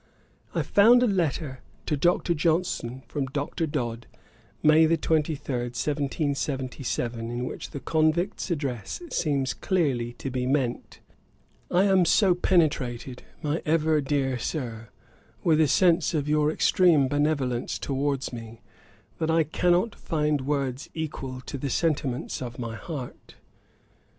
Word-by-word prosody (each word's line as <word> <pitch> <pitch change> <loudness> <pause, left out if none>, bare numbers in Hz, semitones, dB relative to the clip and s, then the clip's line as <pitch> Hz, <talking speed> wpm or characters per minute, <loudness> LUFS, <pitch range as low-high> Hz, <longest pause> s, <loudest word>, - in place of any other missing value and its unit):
I - - +1
found 235 +5 +6
a - - +5
letter 160 - -1 0.3
to 150 - 0
Dr. 175 +3 +2
Johnson 155 -6 -1
from 140 -3 -3
Dr. 145 +4 -2
Dodd, 120 -6 -3 0.6
May 155 +1 +6
23, 160 -1 +1 0.2
1777, 130 -2 -2
in 120 +1 -3
which - - -6
The 140 - -7
Convict's 165 +5 0
Address 140 - -3
seems 140 -4 0
clearly 135 -11 0
to 135 - -6
be 125 0 -1
meant: 130 -3 -1 0.7
'I 180 +2 +3
am 190 -3 +4
so 180 +2 +4
penetrated, 145 -9 0 0.2
my 150 +2 -1
ever 155 -1 +2
dear 135 -2 0
Sir, 115 -5 -4 0.5
with 160 -2 +4
a 155 - +4
sense 170 +3 +3
of 145 -2 -1
your 150 0 +3
extreme 160 -4 +4
benevolence 140 -4 0
towards 140 -1 -2
me, 115 -1 -8 0.6
that 160 - 0
I 165 0 +4
cannot 180 +7 +1
find 150 -2 -1
words 135 -1 -2
equal 135 -5 -5
to 135 +2 -6
the 140 - -3
sentiments 140 -5 -1
of 120 -2 -6
my 115 -2 -5
heart. 135 -1 -8
145 Hz, 130 wpm, -26 LUFS, 130-160 Hz, 0.7 s, found